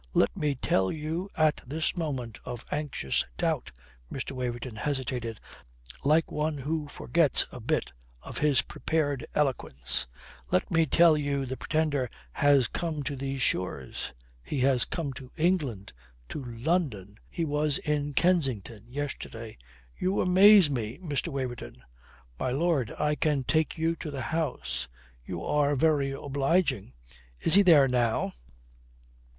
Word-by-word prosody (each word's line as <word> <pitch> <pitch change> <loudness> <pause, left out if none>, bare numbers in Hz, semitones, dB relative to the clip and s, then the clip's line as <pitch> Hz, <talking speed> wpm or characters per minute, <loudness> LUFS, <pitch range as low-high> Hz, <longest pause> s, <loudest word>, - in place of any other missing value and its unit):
"Let - - +3
me 145 -2 0
tell 95 -6 +1
you 160 +5 -3
at 155 -1 +3
this 155 +8 -1
moment 130 - -3
of 120 -1 -7
anxious 145 - 0
doubt," - - -1 0.4
Mr. 135 - -4
Waverton 125 -2 -4
hesitated 125 -3 -3 0.6
like 155 +3 +3
one 150 0 -1
who 150 +2 -2
forgets 160 +1 +2
a 125 - -8
bit 115 - -1 0.3
of - - -5
his 145 -3 +4
prepared 145 -4 -1
eloquence, 65 - -1 0.4
"let 90 - +1
me 165 -1 +3
tell 165 +2 +6
you 140 -2 -1
the 130 +1 -4
Pretender 145 -4 0 0.2
has 140 - +4
come 160 -4 -3
to 140 - -3
these 135 0 -2
shores. 70 -8 -1 0.3
He 130 - -3
has 130 -2 +3
come 150 -6 -3
to 130 0 -10
England, 150 - 0 0.4
to 145 - -5
London. 115 - -2
He 165 - -2
was 150 -1 +1
in 145 -1 -2
Kensington 130 - +1
yesterday." 120 -4 -6 0.4
"You 185 +2 0
amaze 190 0 +7
me, 120 -4 -3
Mr. 155 -5 -2
Waverton." 120 - -5 0.6
"My - - 0
lord, 140 -3 +1
I 150 0 +1
can 150 -2 +1
take 155 +5 +1
you 165 +1 +1
to 155 - -6
the 135 -3 -4
house." 125 - -2 0.4
"You 85 +5 -5
are 145 -1 +2
very 145 -1 +2
obliging. 140 - 0 0.5
Is 165 - +1
he 200 - +8
there 160 -8 +7
now?" 120 -3 +1
140 Hz, 140 wpm, -28 LUFS, 125-155 Hz, 0.6 s, he